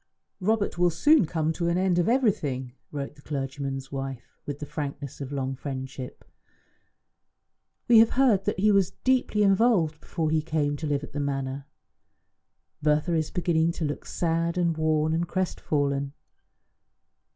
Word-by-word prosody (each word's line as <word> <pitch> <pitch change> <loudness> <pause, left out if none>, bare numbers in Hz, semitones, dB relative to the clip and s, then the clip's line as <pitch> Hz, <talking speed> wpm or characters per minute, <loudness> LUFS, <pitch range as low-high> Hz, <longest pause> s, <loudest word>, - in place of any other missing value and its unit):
"Robert 205 -2 0
will 175 0 +5
soon 190 - +4
come 160 -1 0
to 170 +1 -2
an 170 +1 +1
end 185 -1 +2
of 175 - +2
everything," 145 - 0 0.2
wrote 140 -1 -5
the 145 - -18
clergyman's 135 -1 -4
wife 135 -3 -6
with 145 -1 -3
the 150 - -6
frankness 145 -2 -6
of 135 0 -5
long 135 -1 -2
friendship. 130 -1 -7 1.6
"We 235 -2 +8
have 225 0 +6
heard 235 -8 +4
that 210 - 0
he 210 +2 +4
was 195 -3 +3
deeply 255 -5 +2
involved 195 -6 +3
before 160 -3 -2
he 160 -1 +2
came 150 -2 -1
to 155 - -4
live 145 -1 0
at - - -8
the 145 - -3
Manor. 135 -1 -3 1.1
Bertha 150 +3 +2
is 160 -2 0
beginning 170 -1 +1
to 160 - -3
look 145 - -4
sad 170 0 -1
and 170 -2 +1
worn 155 0 +1
and 170 +1 0
crestfallen. 145 -6 -1
155 Hz, 155 wpm, -26 LUFS, 140-180 Hz, 1.6 s, We